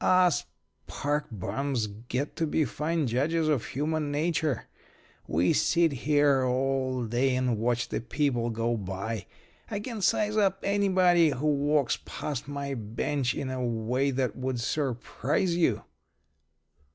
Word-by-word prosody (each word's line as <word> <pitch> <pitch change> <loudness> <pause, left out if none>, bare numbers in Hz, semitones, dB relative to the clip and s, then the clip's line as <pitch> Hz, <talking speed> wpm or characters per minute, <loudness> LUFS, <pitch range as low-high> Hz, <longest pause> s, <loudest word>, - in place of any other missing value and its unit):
Us 180 -3 +4 0.4
park 145 +1 -1
bums 115 +5 -2
get 120 +7 -4
to 165 - +1
be 155 +1 +1
fine 155 +5 -1
judges 150 +7 +1
of 145 -7 +2
human 150 +1 -1
nature. 155 -3 0 0.6
We 85 +3 +2
sit 170 -2 +3
here 140 0 +3
all 130 0 0
day 125 +3 +1
and 125 -4 0
watch 120 +1 0
the - - -2
people 120 0 0
go 115 +1 0
by. 100 +2 -4 0.4
I 205 - -2
can 220 0 -5
size 210 +3 +2
up 195 -2 +3
anybody 185 -4 +4
who 140 +1 -3
walks 145 -2 +2
past 140 -4 -5
my 140 -1 -4
bench 120 +3 -1
in 130 - -3
a 130 -1 -2
way 120 +3 0
that 130 -5 -1
would 130 -1 -2
surprise 135 - -1
you." 160 -11 +2
135 Hz, 140 wpm, -28 LUFS, 120-155 Hz, 0.6 s, Us